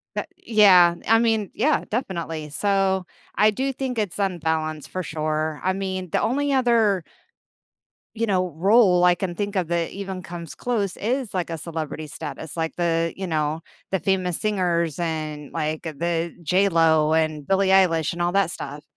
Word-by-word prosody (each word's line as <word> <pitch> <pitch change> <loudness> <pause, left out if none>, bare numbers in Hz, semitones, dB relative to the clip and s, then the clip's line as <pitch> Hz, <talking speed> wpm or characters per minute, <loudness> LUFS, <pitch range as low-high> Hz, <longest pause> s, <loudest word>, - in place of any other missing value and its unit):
That - - -3
yeah. 185 -6 +5
I 225 +1 +5
mean, 225 -3 +1
yeah, 300 +7 +1
definitely, 170 - -3
so, 190 +2 +1 0.3
I 215 +1 +5
do 265 +6 -2
think 255 -3 -3
it's 205 -5 -2
unbalanced, 160 -5 -2
for 185 - -4
sure. 155 -1 -2
I 185 - +1
mean, 190 -1 -4
the - - +1
only 280 +4 0
other 230 -8 +3 1.1
you 230 +1 0
know, 185 -5 0
role 190 0 +4
I 180 0 +6
can 175 0 -4
think 205 0 -3
of 180 -3 0
that 170 0 -1
even 190 -2 -6
comes 170 -2 -8
close 215 -6 -2
is, 245 +1 -2
like, 180 -3 -2
a 165 - -3
celebrity 155 -1 -5
status, 150 0 -7
like, 160 -1 -3
the 165 -1 0
you 190 0 -4
know, 155 -1 -1 0.3
the 190 - +1
famous 185 -2 0
singers, 175 -7 0
and 155 -3 -4
like, 155 0 -3
uh, 160 - -4
the 170 +1 -1
J.Lo, 165 -4 +3
and 155 -2 0
Billie 195 +2 +2
Eilish, 175 -5 +3
and 175 - -5
all 175 0 +1
that 195 -2 +2
stuff, 145 0 -7
180 Hz, 170 wpm, -23 LUFS, 160-200 Hz, 1.1 s, I